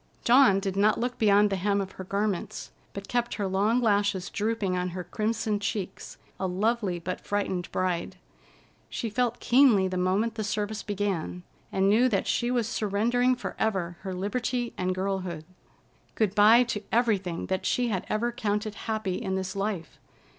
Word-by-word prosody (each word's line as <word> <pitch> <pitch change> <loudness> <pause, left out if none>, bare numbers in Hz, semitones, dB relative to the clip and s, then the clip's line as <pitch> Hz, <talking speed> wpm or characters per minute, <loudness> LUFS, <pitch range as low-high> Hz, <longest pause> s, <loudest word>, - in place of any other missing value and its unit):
Dawn 240 -5 +6
did 195 -1 -3
not 210 +2 +3
look 245 +1 -2
beyond 205 -1 +4
the 195 - 0
hem 200 +2 +1
of 190 -1 -3
her 190 - -8
garments, 200 0 -2 0.2
but 200 0 -8
kept 240 -1 -1
her 205 - -2
long 205 +5 +2
lashes 205 -4 +1
drooping 210 -3 -1
on 180 0 -1
her 180 - -3
crimson 215 +3 -1
cheeks, 195 -2 -4 0.2
a 190 - 0
lovely 200 0 0
but 180 +2 -5
frightened 190 -3 -2
bride. 180 -2 -1 0.7
She 230 - -4
felt 240 +1 0
keenly 240 -7 +5
the 185 0 -3
moment 195 +5 +1
the 220 -1 -3
service 210 0 -2
began, 195 -4 -3 0.3
and 190 0 +2
knew 230 +5 +4
that 195 -5 0
she 240 - 0
was 240 -3 +1
surrendering 235 +5 +1
forever 190 -7 -2
her 190 -1 -5
liberty 240 +5 -2
and 185 0 -1
girlhood. 185 -4 -3 0.7
Good 210 -4 +1
by 215 +4 +7
to 230 -4 -3
everything 200 -7 +1
that 190 0 -2
she 245 -1 +1
had 190 -5 -2
ever 235 +3 0
counted 210 -2 -2 0.2
happy 215 -3 -1
in 190 -4 -2
this 190 0 -3
life. 195 -4 -3
205 Hz, 170 wpm, -27 LUFS, 190-225 Hz, 0.7 s, by